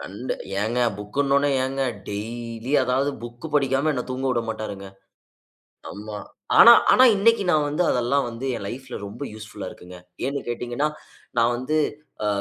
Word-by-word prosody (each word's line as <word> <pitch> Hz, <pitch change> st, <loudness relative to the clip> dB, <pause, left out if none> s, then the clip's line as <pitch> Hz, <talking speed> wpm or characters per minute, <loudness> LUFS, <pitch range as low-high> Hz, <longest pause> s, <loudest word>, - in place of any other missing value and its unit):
கண்ட 105 Hz, +7 st, -5 dB, 0.3 s
ஏங்க 115 Hz, +4 st, -1 dB, 0.2 s
புக்னவுனே 140 Hz, +7 st, +1 dB
ஏங்க, 135 Hz, +1 st, -2 dB, 0.3 s
டெய்லி 115 Hz, +4 st, -5 dB
அதாவது 130 Hz, +3 st, +1 dB
புக் 120 Hz, +6 st, -8 dB
படிக்காம 140 Hz, +1 st, +2 dB
என்ன 125 Hz, -3 st, -2 dB
தூங்கவுடமாட்டாருங்க. 115 Hz, -6 st, -3 dB, 1.1 s
அம்மா. 105 Hz, +1 st, -7 dB, 0.4 s
ஆனா, 235 Hz, -, +11 dB, 0.2 s
ஆனா 255 Hz, -, +7 dB
இன்னக்கி 215 Hz, +1 st, +3 dB
நான் 150 Hz, -2 st, +3 dB
வந்து 150 Hz, +5 st, 0 dB
அதெல்லாம் 125 Hz, +3 st, +1 dB
வந்து 115 Hz, +3 st, -6 dB
என் 100 Hz, -, -6 dB
லைஃப்‌ல 130 Hz, +3 st, -7 dB
ரொம்ப 100 Hz, +8 st, -7 dB
யூஸ்ஃபுலா 110 Hz, -1 st, -8 dB
இருக்குங்க. 90 Hz, +1 st, -12 dB, 0.3 s
ஏன்னு 140 Hz, +1 st, -1 dB
கேட்டீங்கன்னா, 120 Hz, +5 st, -1 dB, 0.5 s
நான் 120 Hz, +1 st, +3 dB
வந்து 130 Hz, +6 st, -1 dB, 0.5 s
அ -, -, +1 dB
125 Hz, 135 wpm, -24 LUFS, 115-140 Hz, 1.1 s, ஆனா